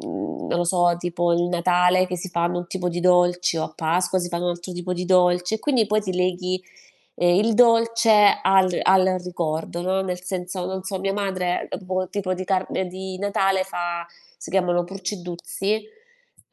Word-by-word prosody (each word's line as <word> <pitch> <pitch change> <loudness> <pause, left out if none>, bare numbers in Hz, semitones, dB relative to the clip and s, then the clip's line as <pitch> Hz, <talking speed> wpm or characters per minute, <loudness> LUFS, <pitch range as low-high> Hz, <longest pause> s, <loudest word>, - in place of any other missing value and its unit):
non - - -4
lo 175 - +1
so 175 0 +3
tipo 175 0 0
il 170 - +2
Natale 180 +1 +3
che 180 - -3
si 180 +2 -6
fanno 175 0 -1
un 175 - -5
tipo 180 0 -3
di 175 0 -3
dolce 180 -1 +3
o - - 0
a 155 - -8
Pasqua 180 +4 0
si 175 -1 -3
fanno 170 +1 -3
un 175 - +1
altro 175 +1 -6
tipo 175 +1 -4
di 180 0 -3
dolce 180 +1 +3
e - - -13
quindi 250 -8 +2
poi 215 +1 +1
ti 190 -2 -3
leghi, 180 0 -1 0.5
ehm, 175 0 +3
il 225 -1 +1
dolce 230 -3 +5
al 190 -2 +3
al 185 -1 +4
ricordo, 170 -1 -3
no, 190 +1 0
nel 180 -1 -4
senso, 180 0 -4
non 190 0 -4
so, 190 0 -4
mia 195 +1 -1
madre, 190 -3 -2
ehm, 195 - -6
boh 185 0 -2
tipo 195 -2 -2
di 185 +1 -5
tarn 190 -1 -1
di 190 +1 -7
Natale 195 -1 +1
fa 175 -2 -4 0.3
si - - -10
chiamano 175 -2 +1
Purceddhruzzi 190 +2 -4 0.6
e - - -57
180 Hz, 190 wpm, -23 LUFS, 175-190 Hz, 0.6 s, dolce